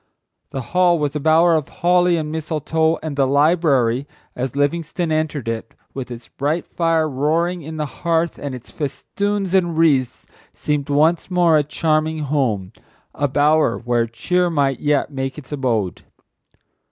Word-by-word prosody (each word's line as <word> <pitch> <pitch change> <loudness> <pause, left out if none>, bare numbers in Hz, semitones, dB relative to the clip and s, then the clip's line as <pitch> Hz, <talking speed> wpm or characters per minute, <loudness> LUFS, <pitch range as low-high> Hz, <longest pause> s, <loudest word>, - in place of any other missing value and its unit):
The 135 - -4
hall 180 -1 +4
was 150 -2 -2
a - - 0
bower 160 +3 +4
of 155 -3 0
holly 180 0 +2
and 155 -1 -3
mistletoe, 160 +1 0
and 155 -3 -4
the 135 -1 +2
library, 140 -4 +2 0.3
as 125 +1 -3
Livingstone 160 +4 -1
entered 155 -5 -1
it, 115 0 -4 0.2
with 130 -2 -6
its 120 -1 -9
bright 150 +5 -2
fire 165 -2 +1
roaring 160 +6 0
in 160 +1 -7
the 155 - -1
hearth 165 +6 -1
and 140 -2 -5
its 125 - -12
festoons 195 +7 -3
and 175 -4 +2
wreaths, 140 -7 +2 0.3
seemed 150 -1 -2
once 155 +5 +2
more 175 -3 +3
a 150 - +5
charming 155 +1 0
home: 120 -9 -1 0.4
a 145 - 0
bower 145 -2 +2
where 120 -1 0
cheer 180 +11 0
might 140 -5 0
yet 145 0 +1
make 135 0 -4
its 150 -2 -11
abode. 115 -10 -1
150 Hz, 155 wpm, -20 LUFS, 135-165 Hz, 0.4 s, a